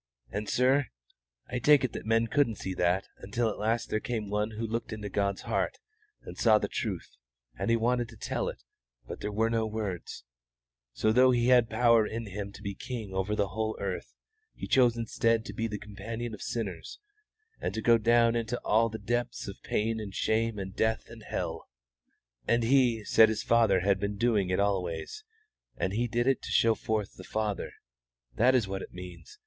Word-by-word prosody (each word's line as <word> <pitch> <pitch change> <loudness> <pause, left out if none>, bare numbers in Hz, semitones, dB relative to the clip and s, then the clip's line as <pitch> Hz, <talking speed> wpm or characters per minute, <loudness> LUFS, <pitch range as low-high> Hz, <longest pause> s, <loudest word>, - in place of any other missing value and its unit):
And, 105 +1 -3
sir, 130 +2 +3 0.6
I 125 - -3
take 145 +2 +5
it 130 - -1
that - - -6
men 115 +1 +3
couldn't 115 -1 +1
see 95 -1 -4
that 90 +1 +1
until 110 +3 -1
at - - -8
last 115 +2 0
there 110 - +1
came 110 -3 -4
One 105 +1 0
who 115 - -2
looked 115 +1 -3
into 105 -2 -5
God's 100 0 -1
heart - - -1 0.5
and - - -9
saw 110 -2 +5
the - - -1
truth, - - -4 0.4
and - - -2
He 115 - +5
wanted 120 +1 +1
to - - -13
tell - - -2
it, - - -9 0.4
but - - -7
there 105 - -3
were 110 +2 +1
no 110 -1 +1
words, 105 -5 -5 0.7
so 110 - +1
though 130 +3 +6
He 120 -1 +3
had 120 -3 +5
power 115 -1 +4
in 115 +1 -4
Him 100 0 -5
to 105 - -12
be 100 -1 -3
King 110 -2 -6
over 95 +3 -1
the 100 -2 0
whole 110 0 -2
earth, 95 -2 -4 0.4
He - - -6
chose 120 -3 +4
instead 115 0 +1
to 105 - -7
be 115 +2 -2
the 105 -2 -4
companion 110 +3 -6
of 105 - -8
sinners, 100 -8 -4 0.6
and - - -2
to 110 - -2
go 115 -1 +5
down 115 +1 +4
into 115 +1 -1
all 115 +2 +3
the 110 - -5
depths 120 +3 -2
of 100 - -8
pain 110 +1 -1
and 100 -3 -7
shame 115 0 0
and 95 0 -6
death 110 0 0
and - - -11
hell. - - -4 0.8
And 115 0 +3
He 120 -3 +3
said 110 +1 +6
His 110 - -2
Father 110 -5 +4
had 100 +1 +2
been 100 0 -2
doing 105 -4 +2
it 90 - +1
always, 95 - -1 0.5
and 95 - -1
He 120 +3 0
did 120 +1 0
it 135 -1 +2
to - - -7
show 115 0 +4
forth 110 -1 -3
the - - -9
Father. 105 -2 -3 0.6
That 125 - +4
is 115 -6 +2
what 95 0 -4
it - - -10
means. 90 - -10
110 Hz, 200 wpm, -29 LUFS, 100-115 Hz, 0.8 s, though